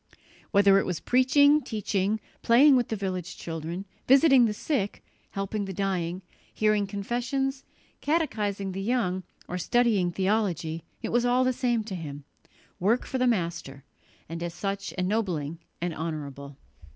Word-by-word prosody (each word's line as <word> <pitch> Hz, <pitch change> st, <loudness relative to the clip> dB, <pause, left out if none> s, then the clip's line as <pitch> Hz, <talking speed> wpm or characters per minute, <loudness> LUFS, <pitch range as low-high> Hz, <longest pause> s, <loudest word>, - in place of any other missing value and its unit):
Whether 200 Hz, -1 st, +5 dB
it -, -, -1 dB
was 180 Hz, -3 st, -2 dB
preaching, 285 Hz, +4 st, +4 dB
teaching, 210 Hz, -3 st, -1 dB, 0.2 s
playing 270 Hz, +5 st, +6 dB
with 245 Hz, -2 st, +2 dB
the 220 Hz, -, -2 dB
village 185 Hz, -3 st, -4 dB
children, 165 Hz, +3 st, -5 dB, 0.2 s
visiting 270 Hz, -2 st, +6 dB
the 220 Hz, -, +1 dB
sick, 205 Hz, -6 st, -2 dB, 0.3 s
helping 200 Hz, +1 st, -3 dB
the 195 Hz, -, -5 dB
dying, 185 Hz, -2 st, -2 dB, 0.3 s
hearing 215 Hz, -2 st, +1 dB
confessions, 250 Hz, +7 st, -2 dB, 0.4 s
catechizing 215 Hz, -, -1 dB
the 190 Hz, +1 st, -4 dB
young 195 Hz, -4 st, 0 dB, 0.3 s
or 180 Hz, -, -4 dB
studying 215 Hz, -3 st, +2 dB
theology, 180 Hz, -4 st, -1 dB, 0.2 s
it -, -, -2 dB
was 240 Hz, 0 st, +2 dB
all 245 Hz, +1 st, +3 dB
the 255 Hz, 0 st, +2 dB
same 240 Hz, -3 st, 0 dB
to 210 Hz, -2 st, -7 dB
him 145 Hz, -5 st, -6 dB, 0.6 s
work 220 Hz, +7 st, +2 dB
for 260 Hz, -, -3 dB
the 255 Hz, -, +3 dB
Master, 170 Hz, -, -2 dB, 0.4 s
and 165 Hz, +1 st, -6 dB
as 170 Hz, 0 st, -4 dB
such 195 Hz, +1 st, -3 dB
ennobling 180 Hz, -6 st, -1 dB, 0.2 s
and 175 Hz, 0 st, -2 dB
honourable. 145 Hz, -4 st, -6 dB
200 Hz, 145 wpm, -27 LUFS, 175-240 Hz, 0.6 s, playing